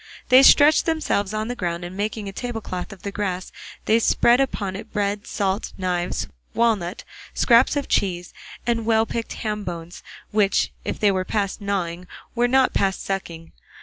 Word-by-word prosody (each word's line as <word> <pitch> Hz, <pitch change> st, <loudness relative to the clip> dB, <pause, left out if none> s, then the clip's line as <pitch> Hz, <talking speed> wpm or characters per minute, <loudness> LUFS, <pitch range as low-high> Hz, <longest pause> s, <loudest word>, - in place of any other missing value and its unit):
They 255 Hz, +1 st, +8 dB
stretched 290 Hz, +4 st, +6 dB
themselves 310 Hz, -11 st, 0 dB
on 215 Hz, 0 st, -2 dB
the 245 Hz, -, -3 dB
ground, 175 Hz, -4 st, -3 dB
and 175 Hz, +1 st, -8 dB
making 210 Hz, +1 st, -3 dB
a -, -, -4 dB
tablecloth 220 Hz, -4 st, -5 dB
of 195 Hz, -, -13 dB
the 200 Hz, -, -4 dB
grass 185 Hz, -3 st, -3 dB, 0.3 s
they 225 Hz, +1 st, +4 dB
spread 235 Hz, +2 st, +4 dB
upon 200 Hz, -8 st, -2 dB
it 195 Hz, -, -8 dB
bread, 205 Hz, -1 st, -2 dB
salt, 195 Hz, +1 st, -2 dB
knives, 180 Hz, -2 st, -1 dB, 0.3 s
walnut, 215 Hz, -5 st, 0 dB, 0.3 s
scraps 240 Hz, +4 st, +4 dB
of 285 Hz, -1 st, -2 dB
cheese, 175 Hz, -3 st, -1 dB, 0.3 s
and 230 Hz, -1 st, -1 dB
well 225 Hz, -1 st, +3 dB
picked 230 Hz, 0 st, -4 dB
ham 210 Hz, -2 st, -3 dB
bones 170 Hz, -2 st, -7 dB, 0.3 s
which 205 Hz, -2 st, +2 dB
if -, -, -4 dB
they 205 Hz, -2 st, +4 dB
were 185 Hz, -1 st, 0 dB
past 200 Hz, +1 st, -2 dB
gnawing 180 Hz, -3 st, -3 dB, 0.3 s
were 245 Hz, 0 st, +2 dB
not 260 Hz, +1 st, +3 dB
past 195 Hz, -1 st, 0 dB
sucking. 170 Hz, -4 st, -5 dB
205 Hz, 170 wpm, -23 LUFS, 185-230 Hz, 0.3 s, They